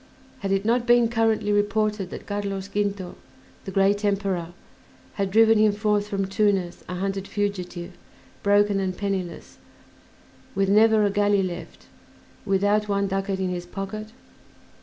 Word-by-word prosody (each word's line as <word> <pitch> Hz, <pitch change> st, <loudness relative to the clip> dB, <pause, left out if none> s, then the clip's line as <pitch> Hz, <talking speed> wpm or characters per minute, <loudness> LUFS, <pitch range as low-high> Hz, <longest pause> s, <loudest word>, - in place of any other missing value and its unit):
Had 195 Hz, -1 st, -3 dB
it 195 Hz, +1 st, +1 dB
not 235 Hz, +2 st, +1 dB
been 240 Hz, -1 st, +5 dB
currently 225 Hz, -2 st, +1 dB
reported 205 Hz, -1 st, 0 dB
that -, -, -8 dB
Carlos 200 Hz, -1 st, -3 dB
Quinto, 200 Hz, -2 st, -2 dB, 0.5 s
the 195 Hz, -, -5 dB
great 195 Hz, +2 st, +2 dB
Emperor, 195 Hz, -4 st, 0 dB, 0.7 s
had 195 Hz, -2 st, -1 dB
driven 225 Hz, +2 st, +5 dB
him 215 Hz, -1 st, +4 dB
forth 210 Hz, -1 st, 0 dB
from 195 Hz, -1 st, -1 dB
Tunis 195 Hz, -3 st, 0 dB
a 180 Hz, -, -3 dB
hunted 195 Hz, +1 st, -3 dB
fugitive, 185 Hz, -3 st, -3 dB, 0.5 s
broken 205 Hz, 0 st, +3 dB
and 185 Hz, -1 st, -2 dB
penniless, 195 Hz, -4 st, -4 dB, 1.0 s
with 195 Hz, 0 st, +1 dB
never 215 Hz, +1 st, +5 dB
a 200 Hz, -, +1 dB
galley 205 Hz, -1 st, +2 dB
left, 175 Hz, -2 st, -7 dB, 0.6 s
without 205 Hz, +2 st, +2 dB
one 200 Hz, 0 st, +1 dB
ducat 195 Hz, 0 st, -2 dB
in 190 Hz, -1 st, -1 dB
his 175 Hz, -1 st, -4 dB
pocket? 215 Hz, +3 st, -6 dB
200 Hz, 140 wpm, -24 LUFS, 195-210 Hz, 1.0 s, been